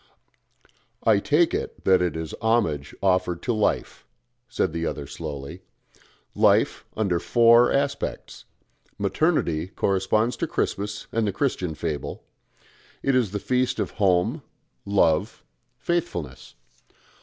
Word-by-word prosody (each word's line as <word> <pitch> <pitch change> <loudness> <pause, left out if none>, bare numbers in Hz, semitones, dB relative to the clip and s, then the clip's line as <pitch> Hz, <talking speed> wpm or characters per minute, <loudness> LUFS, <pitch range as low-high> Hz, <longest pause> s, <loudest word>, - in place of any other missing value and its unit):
"I 110 -3 +4
take 160 +9 +2
it - - -4
that 95 -1 +4
it 90 -2 -1
is 80 -1 -5
homage 105 -12 0
offered 90 -2 +1
to 120 - 0
Life," 110 -2 -1 0.4
said - - -1
the 85 0 -3
other 75 -3 -3
slowly. 75 +3 -7 0.7
"Life - - +3
under 95 -6 +1
four 115 +3 +5
aspects 140 0 -2 0.5
Maternity 90 - 0
corresponds 100 +5 0
to - - -2
Christmas 105 +1 -2
and 115 -1 0
the - - +1
Christian 95 - -2
fable; 75 -2 -4 0.8
it 135 - +2
is 125 -5 +2
the 105 - -3
feast 125 +4 0
of - - -2
home, 100 - +2 0.5
love, 100 +1 +1 0.3
faithfulness. 85 - -3
100 Hz, 120 wpm, -24 LUFS, 85-120 Hz, 0.8 s, four